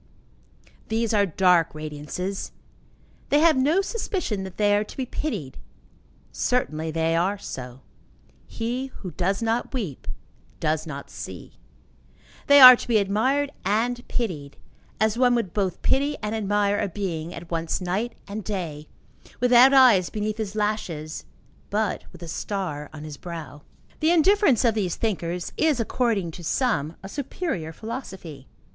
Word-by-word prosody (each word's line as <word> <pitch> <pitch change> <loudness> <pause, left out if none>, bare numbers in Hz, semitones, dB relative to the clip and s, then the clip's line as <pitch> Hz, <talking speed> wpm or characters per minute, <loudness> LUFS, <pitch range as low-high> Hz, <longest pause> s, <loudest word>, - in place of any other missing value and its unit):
These 225 0 0
are 205 -1 +3
dark 175 -2 +3
radiances. 155 +5 -5 0.8
They 290 - +4
have 320 +1 +5
no 295 +9 +3
suspicion 380 - -3
that 190 - -10
they 205 -1 +3
are 205 - +2
to - - -13
be 260 - -1
pitied. 210 - -4 0.7
Certainly 160 -11 -1
they 165 +1 0
are 185 +5 +1
so. 125 -7 -8 0.7
He 245 +4 -3
who 195 -8 -9
does 190 +7 -1
not 230 +4 -1
weep 190 - -4 0.5
does 155 0 -1
not 140 -2 -7
see. - - -9 0.9
They 285 0 +8
are 255 -1 +13
to - - -8
be 235 -2 +3
admired 255 +8 +1
and 235 +5 0
pitied, 160 - -3 0.4
as 220 +2 +1
one 250 -1 +4
would 215 -8 -2
both 195 -4 -2
pity 285 +2 +1
and 210 +1 -2
admire 205 -1 +1
a 210 - 0
being 170 -3 -4
at 170 0 -9
once 165 -1 -1
night 195 +6 -2
and 210 +1 -5
day, 165 -8 -4 0.5
without 250 +1 +7
eyes 245 -10 +6
beneath 215 0 -3
his 210 -2 -4
lashes 185 -8 -3 0.4
but 210 0 -1
with 170 - -12
a - - -7
star 165 -4 -4
on 155 -1 -9
his 150 -2 -8
brow. 160 -5 -8 0.4
The 315 - +2
indifference 345 - +4
of 230 - +4
these 195 -6 -1
thinkers, 180 -5 -3
is, 310 -5 +2
according 225 -6 0
to 175 - -10
some, 165 - 0
a - - -6
superior 255 - -4
philosophy. 185 - -8
205 Hz, 150 wpm, -25 LUFS, 165-240 Hz, 0.9 s, are